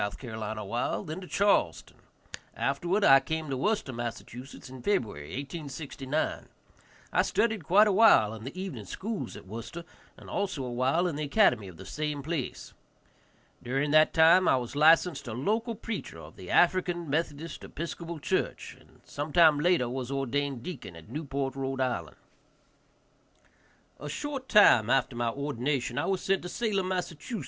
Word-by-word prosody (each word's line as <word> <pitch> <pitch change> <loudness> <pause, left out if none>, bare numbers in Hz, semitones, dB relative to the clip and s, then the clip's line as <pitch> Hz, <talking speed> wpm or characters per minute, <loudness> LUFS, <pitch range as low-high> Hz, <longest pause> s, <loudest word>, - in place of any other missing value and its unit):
awhile, 110 0 -3
then 160 +4 -6
to 180 - -9
Charleston. 195 - +1 0.6
Afterward 175 +9 0
I 135 -5 +8
came 160 +1 -4
to - - 0
Worcester, 205 -1 -1
Mass., 120 -1 -4
in 130 +1 -11
February, 105 - -1
1869. 140 0 -4 0.7
I - - +4
studied 220 -6 0
quite 195 +8 +5
a - - +3
while 195 - +6
in 110 -1 -9
the 140 +9 -7
evening 160 - -6
schools 205 - -5
at - - -12
Worcester, 115 - -7 0.3
and - - -14
also 185 -9 -2
a 125 - -4
while 130 +8 +1
in 165 -5 -2
the 150 - -2
academy 140 - +3
of 90 -3 -12
the 95 - -10
same 150 +6 -3
place. 155 -4 -4 0.9
During 135 +4 -1
that 155 +1 +6
time 170 +3 +6
I - - +5
was 125 +1 -5
licensed 160 0 +4
a 115 - -4
local 220 - -1
preacher 210 - -6
of 80 0 -12
the 90 - -11
African 175 -1 +2
Methodist 150 +1 -3
Episcopal 170 +1 -6
church, 145 - -2
and - - -23
sometime 155 +1 +3
later 170 -5 +2
was 125 0 -4
ordained 135 -1 -2
deacon 145 - -7
at 85 +4 -13
Newport, 140 -1 -3
R.I. 135 -1 -2 1.9
A 150 - -6
short 275 - -5
time 120 - +6
after 130 -1 +2
my 120 -1 0
ordination 140 -1 -2
I - - -1
was 190 -2 0
sent 195 -1 +1
to 180 - -7
Salem, 200 -3 -1
Mass. 180 -2 -2
145 Hz, 155 wpm, -29 LUFS, 125-175 Hz, 1.9 s, I